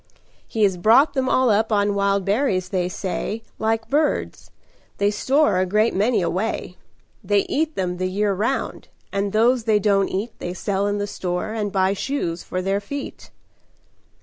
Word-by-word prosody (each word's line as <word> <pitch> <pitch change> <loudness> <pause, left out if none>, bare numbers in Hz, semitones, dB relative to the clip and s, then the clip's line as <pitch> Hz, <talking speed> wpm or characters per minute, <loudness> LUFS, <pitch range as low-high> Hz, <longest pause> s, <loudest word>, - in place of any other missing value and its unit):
He 220 -3 -1
has 195 -3 +3
brought 225 - +5
them 260 -2 0
all 255 -3 +3
up 220 +2 +1
on 205 -1 +2
wild 200 -1 +1
berries, 195 -4 0
they 180 -2 -1
say, 205 +3 -4 0.2
Like 225 +1 0
birds. 295 +2 -1 0.5
They 200 0 +2
store 265 0 +2
a 185 - +2
great 215 +4 +2
many 210 +1 +2
away. 185 +6 -2 0.5
They 205 -1 +3
eat 315 +1 -1
them 180 -1 -2
the 185 +1 -1
year 200 +2 0
round, 225 +8 -2 0.3
and 200 0 -1
those 230 +2 +3
they 220 -2 +4
don't 200 -1 +2
eat 210 +5 -3
They 175 +1 -5
sell 200 +1 -1
in 205 0 -1
the 205 - -1
store 180 +1 -3
and 210 -2 -2
buy 190 0 +2
shoes 190 -7 -3
for 185 0 -4
their 195 +1 0
feet." 280 +7 -7
205 Hz, 175 wpm, -22 LUFS, 190-225 Hz, 0.5 s, brought